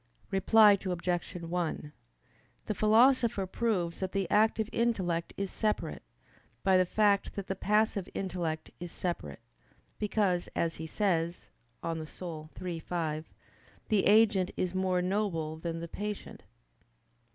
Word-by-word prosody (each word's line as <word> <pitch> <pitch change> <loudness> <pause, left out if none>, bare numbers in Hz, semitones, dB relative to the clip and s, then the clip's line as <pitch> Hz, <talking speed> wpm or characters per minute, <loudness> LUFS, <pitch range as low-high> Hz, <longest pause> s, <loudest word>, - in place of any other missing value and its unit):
Reply 205 +1 +6
Obj. 180 -1 -2
1: 170 -3 -3 0.7
The - - -1
Philosopher 220 0 +4
proves 185 -4 -1
that 190 -1 -3
the 195 -2 0
active 220 0 +3
intellect 185 -8 0
is 195 -1 -3
separate, 215 -1 -1 0.6
by 190 -1 +4
the 185 -1 +4
fact 205 0 +2
that 200 - -4
the 190 - -3
passive 210 -1 +1
intellect 170 -5 -3
is 175 -1 -6
separate: 90 - -4 0.6
because, 200 -4 0
as 165 -1 0
he 160 - -5
says 170 -2 -1 0.3
(De - - -3
Anima 160 -1 -3 0.6
iii, 175 -2 -3
5), 160 -2 -3 0.6
"the 210 -4 +3
agent 205 -3 +5
is 180 -1 -1
more 185 -1 +1
noble 180 -5 -1
than 165 0 -4
the 170 - -5
patient." 210 +4 -6
185 Hz, 130 wpm, -30 LUFS, 170-210 Hz, 0.7 s, Reply